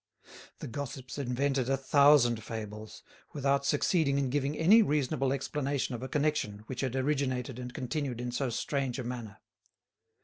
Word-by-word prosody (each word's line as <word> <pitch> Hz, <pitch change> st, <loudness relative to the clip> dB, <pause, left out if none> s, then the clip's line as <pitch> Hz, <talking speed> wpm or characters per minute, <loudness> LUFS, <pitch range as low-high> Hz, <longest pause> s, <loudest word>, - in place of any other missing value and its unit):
The -, -, -7 dB
gossips 135 Hz, +2 st, -6 dB
invented 135 Hz, 0 st, 0 dB
a 135 Hz, -, +2 dB
thousand 135 Hz, -4 st, +4 dB
fables, 110 Hz, -1 st, -7 dB, 0.3 s
without 140 Hz, -1 st, +1 dB
succeeding 145 Hz, -1 st, +2 dB
in 135 Hz, -2 st, 0 dB
giving 145 Hz, +1 st, -1 dB
any 200 Hz, +8 st, +6 dB
reasonable 140 Hz, -, +1 dB
explanation 140 Hz, -1 st, -2 dB
of 120 Hz, -, -5 dB
a 130 Hz, -, -5 dB
connection 145 Hz, -9 st, -1 dB
which 125 Hz, +1 st, -5 dB
had 130 Hz, -2 st, -2 dB
originated 130 Hz, -2 st, -1 dB
and 125 Hz, 0 st, -6 dB
continued 130 Hz, 0 st, -3 dB
in 125 Hz, 0 st, -3 dB
so 130 Hz, +2 st, -1 dB
strange 135 Hz, +2 st, -2 dB
a 130 Hz, -, -3 dB
manner. 120 Hz, -4 st, -6 dB
135 Hz, 150 wpm, -30 LUFS, 125-140 Hz, 0.3 s, any